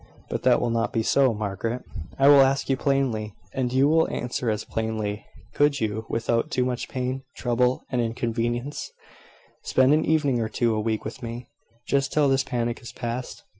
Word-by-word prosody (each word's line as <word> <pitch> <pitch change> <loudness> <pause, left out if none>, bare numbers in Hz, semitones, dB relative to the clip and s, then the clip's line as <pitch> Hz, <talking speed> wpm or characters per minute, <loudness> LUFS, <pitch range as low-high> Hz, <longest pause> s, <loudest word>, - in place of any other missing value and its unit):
But - - -2
that - - +4
will 120 - 0
not 115 0 0
be 115 - 0
so, 135 +2 +4
Margaret, 110 +3 -3 0.3
I 135 - +4
will 140 -1 +9
ask 135 +1 +2
you - - +3
plainly, 130 -7 0 0.2
and 130 -2 -1
you 130 +2 +4
will 160 +2 +3
answer 120 0 -2
as 105 -1 -2
plainly 110 -2 -3 0.3
could 145 -1 +2
you, 110 0 -2
without 115 0 0
too 125 - 0
much 125 -1 -3
pain, 130 0 -3
trouble, 125 +1 +1
and 125 -2 +1
inconvenience, 120 +3 -2 0.7
spend 130 +2 +3
an 155 +1 +3
evening 145 -6 +2
or 110 -1 -1
two 115 0 +1
a 110 - 0
week 110 0 -2
with 110 - -6
me, 120 0 -7 0.4
just 135 0 +1
till 150 -2 +3
this 135 0 +2
panic 120 -1 -2
is 120 -2 -9
passed? 120 +2 -5
120 Hz, 185 wpm, -25 LUFS, 115-135 Hz, 0.7 s, will